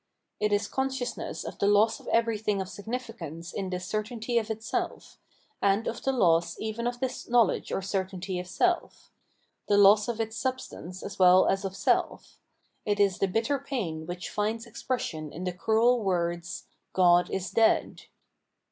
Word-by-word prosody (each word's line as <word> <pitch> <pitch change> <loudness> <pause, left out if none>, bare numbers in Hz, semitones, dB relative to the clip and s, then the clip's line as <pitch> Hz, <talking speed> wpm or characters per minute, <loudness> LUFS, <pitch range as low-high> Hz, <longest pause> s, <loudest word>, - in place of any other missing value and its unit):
It 210 0 +1
is 205 0 +1
consciousness 265 -2 -3
of - - -8
the 200 - +2
loss 205 +2 +4
of - - -16
everything 220 -3 +1
of 190 - -3
significance 200 - -6
in 195 -2 -3
this 180 0 -4
certainty 225 +3 -1
of 220 -1 -6
itself, 220 0 -4 0.4
and 200 +3 +2
of 230 - -3
the 270 - +1
loss 170 -9 +2
even 220 +2 -3
of 245 0 -3
this 255 -1 -4
knowledge 235 -4 +2
or 195 - -2
certainty 190 -1 -3
of 180 - -6
self 355 - -1 0.3
— - - -45
the 205 - +4
loss 205 +1 +6
of 235 -2 -3
its 225 0 -2
substance 240 -9 -4
as 200 - -7
well 185 0 +7
as 195 0 +1
of 195 -1 -4
self; - - 0 0.4
it 205 -1 0
is 200 -3 +3
the 195 - +2
bitter 225 +8 0
pain 185 - -4
which 175 +1 -5
finds 220 +2 -1
expression 215 - -4
in 175 - -7
the 180 -1 -2
cruel 225 +6 +3
words, 175 -3 -2
" - - -50
God 175 -1 +5
is 190 0 -3
dead." 225 -1 +2
205 Hz, 175 wpm, -28 LUFS, 185-230 Hz, 0.4 s, well